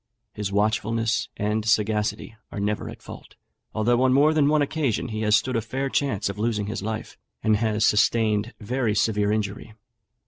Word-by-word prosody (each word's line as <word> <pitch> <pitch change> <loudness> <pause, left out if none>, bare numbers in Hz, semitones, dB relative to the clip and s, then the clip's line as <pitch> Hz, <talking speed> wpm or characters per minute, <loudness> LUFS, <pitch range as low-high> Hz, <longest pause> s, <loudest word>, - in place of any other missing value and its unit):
His 105 -2 -4
watchfulness 110 +2 0
and 105 +1 -1
sagacity 105 0 0 0.2
are - - -5
never 105 +1 -2
at - - -11
fault, - - -11 0.4
although 120 +3 +1
on 130 0 +4
more 145 +3 +5
than 150 -2 +3
one 150 0 +3
occasion 140 -6 -1
he 110 0 -4
has 105 -1 +4
stood 130 +2 0
a 115 - +1
fair 135 +5 -3
chance 125 -8 0
of 100 +1 -5
losing 105 -2 0
his 110 +1 -4
life, 110 +2 -5 0.2
and 110 -1 +3
has 110 0 +1
sustained 110 0 +2
very 115 0 -1
severe 105 -2 +1
injury. 105 0 -3
110 Hz, 175 wpm, -24 LUFS, 105-120 Hz, 0.4 s, more